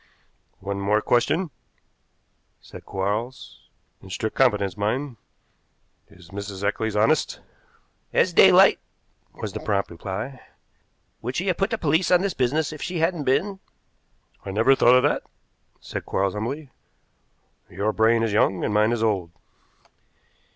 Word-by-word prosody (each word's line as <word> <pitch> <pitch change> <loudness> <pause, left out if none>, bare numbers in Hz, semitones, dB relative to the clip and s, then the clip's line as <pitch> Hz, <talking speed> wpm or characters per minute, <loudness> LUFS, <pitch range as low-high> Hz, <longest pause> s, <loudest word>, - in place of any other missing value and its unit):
"One 100 0 -4
more 105 +2 +2
question," 155 +10 +1 1.1
said - - -13
Quarles, 105 +7 -4 0.3
"in 95 - -13
strict 105 +5 -3
confidence, 105 -8 +2
mind. 120 +5 -2 0.9
Is 90 0 -18
Mrs. 100 -1 -6
Eccles 110 +1 -2
honest?" 105 +1 +1 0.7
"As - - +2
daylight," - - +7 0.5
was - - -7
the - - -4
prompt 100 -3 -1
reply. 100 +10 -6 0.8
"Would 125 +3 -4
she 180 - -1
have 185 -3 0
put 195 +2 0
the 225 - -1
police 160 0 +1
on 180 -1 +5
this 195 -2 -1
business 145 +5 0
if 155 - -10
she 180 +3 -3
hadn't 165 -2 0
been?" 190 +9 0 0.8
"I - - -7
never 110 +7 +4
thought 125 -2 +5
of 125 - +4
that," 145 - +1 0.6
said - - -7
Quarles 95 0 0
humbly. 130 +7 -5 1.0
"Your 100 +4 -2
brain 115 +1 +3
is 110 -3 -1
young 95 -3 +2
and 105 - -1
mine 105 +2 +3
is 115 -2 -1
old." 100 -6 0
115 Hz, 140 wpm, -24 LUFS, 100-145 Hz, 1.1 s, daylight